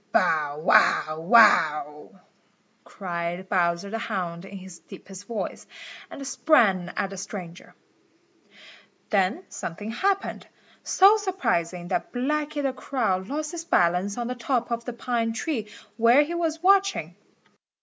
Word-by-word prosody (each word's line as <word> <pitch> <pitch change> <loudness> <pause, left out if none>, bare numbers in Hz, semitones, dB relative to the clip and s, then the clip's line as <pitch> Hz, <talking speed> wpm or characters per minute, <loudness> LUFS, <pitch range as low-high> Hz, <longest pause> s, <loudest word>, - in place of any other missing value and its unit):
"Bow, 150 -2 +1
wow, 155 0 +3
wow!" 160 -5 +3 0.6
cried 175 -1 -5
Bowser 175 +1 0
the 225 - -3
Hound 180 -5 -4
in 195 0 -9
his 185 -2 -11
deepest 195 +1 -12
voice, 230 -2 -5 0.4
and 275 - -8
sprang 205 - +2
at 195 - -1
the 195 - -7
stranger. 185 -3 -8 1.4
Then 200 - +1
something 205 +6 -6
happened, 390 - -1 0.3
so 395 +3 +5
surprising 180 - -2
that - - -2
Blacky 290 +3 -2
the 270 -1 0
Crow 245 -7 -1
lost 300 +3 -4
his 340 -2 -6
balance 180 - +1
on 240 - -2
the 250 - -3
top 245 -1 -2
of 235 0 -3
the 245 - -5
pine 235 -1 -2 0.6
where 235 +5 +5
he 320 +4 -5
was 330 -1 -2
watching. 395 +1 +2
215 Hz, 130 wpm, -25 LUFS, 180-280 Hz, 1.4 s, so